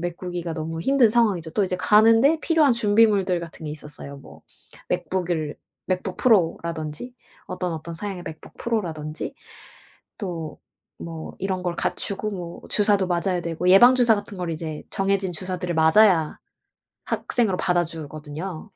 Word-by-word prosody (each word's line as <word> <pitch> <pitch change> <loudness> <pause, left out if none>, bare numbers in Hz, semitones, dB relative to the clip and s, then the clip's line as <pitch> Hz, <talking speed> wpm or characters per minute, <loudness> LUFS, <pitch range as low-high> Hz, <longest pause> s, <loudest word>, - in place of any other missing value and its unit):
메꾸기가 175 -1 -4
너무 165 0 -4
힘든 265 +1 +4
상황이죠. 205 -8 +1
또 210 - +1
이제 185 -1 -2
가는데 225 - +5
필요한 315 -5 +3
준비물들 205 -4 +3
같은 165 -1 -9
게 - - -4
있었어요. 150 -2 -7
뭐 - - -15 0.5
맥북을 170 -5 -2 0.3
맥북 185 0 -2
프로라든지 170 -1 0 0.3
어떤 180 -2 -3
어떤 160 +2 -7
사양의 190 +1 -5
맥북 160 - -10
프로라든지 165 -10 -3 0.8
또 170 -7 -6 0.4
뭐 165 -1 -7
이런 185 -1 -2
걸 175 -1 -2
갖추고 210 +4 -2
뭐 175 -3 -7
주사도 205 -2 +3
맞아야 175 +1 0
되고 170 +1 -3
예방 240 +7 +8
주사 240 -3 +5
같은 205 -1 -6
걸 175 -2 -3
이제 155 -1 -5
정해진 195 -1 0
주사들을 180 0 -3
맞아야 160 0 +4 0.7
학생으로 215 -7 0
받아 175 -2 +2
주거든요. 155 +2 -7
180 Hz, 330 characters per minute, -23 LUFS, 165-205 Hz, 0.8 s, 예방